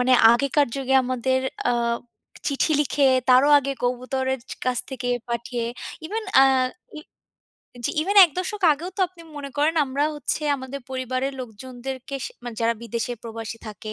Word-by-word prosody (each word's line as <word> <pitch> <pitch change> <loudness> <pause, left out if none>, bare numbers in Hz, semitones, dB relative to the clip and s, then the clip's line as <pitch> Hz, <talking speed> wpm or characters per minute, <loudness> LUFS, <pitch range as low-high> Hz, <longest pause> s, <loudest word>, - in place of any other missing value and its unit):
মানে 250 +1 +3 0.2
আগেকার 280 +4 +2
যুগে 265 -1 0
আমাদের 255 +1 0 0.3
আ - - +3 0.8
চিঠি 285 +2 +1
লিখে, 285 -1 +2 0.2
তারও 255 +3 +6
আগে 275 0 -2
কবুতরের 260 +1 -1 0.3
কাছ 250 -1 +1
থেকে 255 -2 -4 0.2
পাঠিয়ে, 235 0 -3 0.4
even 440 +6 -3 0.2
আ - - +8 0.6
ই - - -7 0.8
জি, - - +1
even 400 +5 -1
১ 345 - -1
দশক 410 +2 -3
আগেও 330 +5 -5
তো - - -3
আপনি 350 -2 -15
মনে 280 -1 -6
করেন 305 +3 +3
আমরা 275 +2 0
হচ্ছে 295 +1 -2
আমাদের 260 +1 -7
পরিবারের 260 +1 -2
লোকজনদেরকে 255 +3 -7
স - - -5 0.2
মানে 240 -2 -6
যারা 230 +1 +2
বিদেশে 235 +1 -3
প্রবাসী 230 -1 -6
থাকে 215 +1 -7
260 Hz, 155 wpm, -24 LUFS, 245-285 Hz, 0.8 s, আ